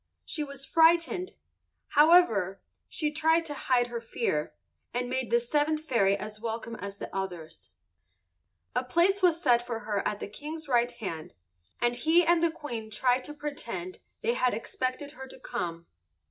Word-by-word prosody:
She 305 - -1
was 280 -1 -5
frightened. 335 +5 +3 0.6
However, 290 - +5 0.3
she 300 -2 -1
tried 320 +2 +2
to 295 - -4
hide 255 -3 +2
her 240 -1 -5
fear, 225 -9 -2 0.4
and 245 0 0
made 260 -1 -1
the 235 +1 +4
seventh 300 +5 0
fairy 200 -8 +3
as 210 +1 -7
welcome 230 0 -4
as 200 0 -7
the - - -8
others. 175 - -5 1.1
A 250 - +2
place 345 +10 +2
was 345 -3 +4
set 240 -6 +3
for 230 -2 -4
her 205 -1 -1
at 205 - -3
the - - -5
King's 300 +8 -7
right 240 -2 +3
hand, 170 -7 -6 0.4
and 240 0 +2
he 320 +7 +4
and 340 0 +4
the 335 - +4
Queen 240 -9 -6
tried 250 +4 +1
to 295 - -7
pretend 230 -12 -5 0.2
they 235 - +1
had 250 -2 +1
expected 255 +5 -3
her 265 -3 -9
to 260 - -12
come. 170 -10 -4
250 Hz, 165 wpm, -29 LUFS, 220-305 Hz, 1.1 s, However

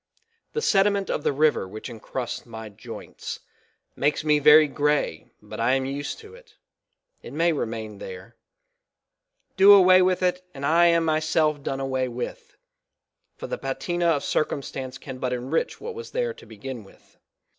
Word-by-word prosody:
The 455 - -2
sediment 200 -1 +2
of 150 - -2
the - - +2
river 150 -7 +2
which 110 +3 -8
encrusts 120 +1 -5
my 110 -1 -8
joints, 100 - -9 0.5
makes 150 +2 0
me 150 -1 +3
very 150 +1 +7
gray 145 - -1
but - - -9
I 120 +3 +2
am 135 0 +1
used 140 +2 -4
to 430 0 -14
it, 470 -2 -17 0.7
it - - -10
may 165 +3 +2
rf 145 - -2
main 110 -2 -7
there; 95 +5 -9 1.2
do 195 +1 +9
away 185 -1 +7
with 185 0 +2
it 180 0 +1
and 140 +1 -5
I 170 +3 +5
am 170 -1 +3
myself 155 -1 +1
done 135 -1 -3
away 130 -1 -1
with, 120 0 -7 0.8
for - - -7
the - - -4
patina 175 -2 -2
of 150 -4 +2
circumstance 135 -3 -2
can 130 -2 -9
but 125 -1 -1
enrich 130 +6 -2
what 470 - -6
was 460 +1 -8
there 485 -1 -1
to 465 -2 -16
begin 130 -4 -8
with. 95 - -22
150 Hz, 165 wpm, -25 LUFS, 130-180 Hz, 1.2 s, do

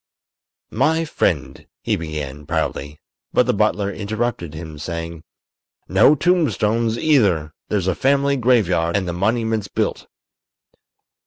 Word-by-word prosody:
"My 160 +8 +2
friend," 85 - -1 0.2
he - - +1
began, 75 -3 -6
proudly; 75 -2 -3 0.3
but - - +4
the - - +1
butler 100 -1 +1
interrupted 105 -6 -3
him, 80 -2 -8
saying: 85 0 -5 0.7
"No 150 - +5
tombstones, 115 -10 +1
either; 100 - +2 0.2
there's 100 -4 0
a 95 - +2
family 140 +5 +2
graveyard 100 -9 +2
and 95 -2 -2
the 85 - -2
monument's 110 +2 0
built." - - -2
100 Hz, 115 wpm, -21 LUFS, 85-120 Hz, 0.7 s, No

